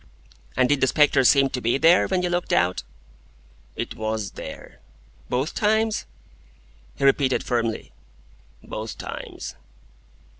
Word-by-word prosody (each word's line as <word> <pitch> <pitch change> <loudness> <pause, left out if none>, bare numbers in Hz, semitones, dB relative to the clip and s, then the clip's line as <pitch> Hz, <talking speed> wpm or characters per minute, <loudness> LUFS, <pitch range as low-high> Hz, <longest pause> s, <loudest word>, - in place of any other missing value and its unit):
"And 130 -1 +4
did 145 0 +1
the 130 - +4
spectre 145 -1 +4
seem 135 +1 +5
to 125 - -3
be 120 +3 +1
there, 165 +5 +5
when 185 -1 0
you 180 - 0
looked 175 0 -1
out?" 90 +1 +2 0.9
"It - - -4
WAS 110 -2 -3
there." - - -10 0.5
"Both 130 +5 -1
times?" 220 +1 +1 0.9
He - - -5
repeated 135 -1 +3
firmly: 115 -3 -2 0.7
"Both 110 +1 -6
times." - - -7
135 Hz, 125 wpm, -24 LUFS, 115-165 Hz, 0.9 s, seem